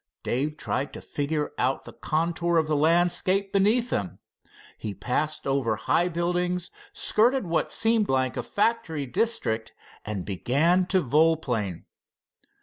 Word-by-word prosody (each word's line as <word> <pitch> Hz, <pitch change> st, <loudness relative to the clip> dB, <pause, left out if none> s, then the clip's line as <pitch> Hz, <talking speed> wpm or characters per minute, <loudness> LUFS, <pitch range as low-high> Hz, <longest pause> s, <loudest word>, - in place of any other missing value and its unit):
Dave 145 Hz, +5 st, -1 dB
tried 140 Hz, -1 st, -2 dB
to -, -, -7 dB
figure 150 Hz, +1 st, -2 dB
out 130 Hz, +2 st, 0 dB
the -, -, -11 dB
contour 170 Hz, +2 st, 0 dB
of 160 Hz, -, +3 dB
the 155 Hz, 0 st, 0 dB
landscape 175 Hz, +5 st, +2 dB
beneath 220 Hz, +5 st, +2 dB
them. 95 Hz, -2 st, -2 dB, 0.6 s
He 105 Hz, -2 st, -6 dB
passed 125 Hz, +9 st, -2 dB
over 135 Hz, -5 st, +1 dB
high 170 Hz, +10 st, +1 dB
buildings, 175 Hz, +1 st, -1 dB, 0.2 s
skirted 250 Hz, -, +2 dB
what 165 Hz, -1 st, 0 dB
seemed 225 Hz, -2 st, +2 dB
like 130 Hz, -1 st, +1 dB
a -, -, -1 dB
factory 200 Hz, -9 st, -1 dB
district, 155 Hz, -, -1 dB, 0.3 s
and 100 Hz, -4 st, -4 dB
began 155 Hz, -, +2 dB
to 185 Hz, -1 st, +2 dB
volplane. 130 Hz, -, +1 dB
160 Hz, 135 wpm, -26 LUFS, 130-180 Hz, 0.6 s, of